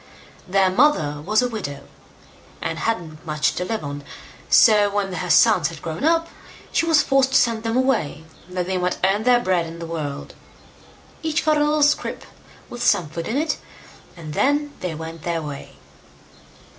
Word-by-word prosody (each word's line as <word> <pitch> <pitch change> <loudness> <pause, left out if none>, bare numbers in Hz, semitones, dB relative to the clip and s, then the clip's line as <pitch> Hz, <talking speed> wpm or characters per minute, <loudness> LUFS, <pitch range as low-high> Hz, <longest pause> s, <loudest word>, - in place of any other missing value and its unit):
Their 190 0 +3
mother 185 - +2
was 215 +7 +2
a - - +1
widow, 190 - -6 0.8
and - - -4
hadn't 165 -9 -3
much 150 -1 0
to - - -3
live 220 +2 -3
on; 145 0 -6 0.5
so 210 -3 +6
when 200 -2 -2
her 180 0 -4
sons 195 -8 +5
had 165 -2 -8
grown 165 - -5
up, 330 +1 +2 0.4
she 330 - +1
was 320 -2 +4
forced 270 -1 +2
to - - +6
send 230 -3 +2
them 225 +1 -1
away, 255 - 0 0.3
that 180 -1 -2
they 185 0 -1
might 180 0 -1
earn 200 +4 +2
their 250 -1 +5
bread 185 -7 0
in 165 +1 -9
the 170 - -6
world. 150 -4 -5 0.9
Each 320 -1 -1
got 310 -1 +3
a 295 - +3
little 300 0 +2
scrip 295 +1 +1 0.4
with 240 - -8
some 175 -9 +2
food 165 +2 -5
in 235 - -1
it, 310 0 0 0.6
and 155 -3 -8
then 290 - +1
they 180 -3 -4
went 160 +1 -8
their 165 0 -2
way. 145 -2 -8
190 Hz, 180 wpm, -22 LUFS, 165-260 Hz, 0.9 s, so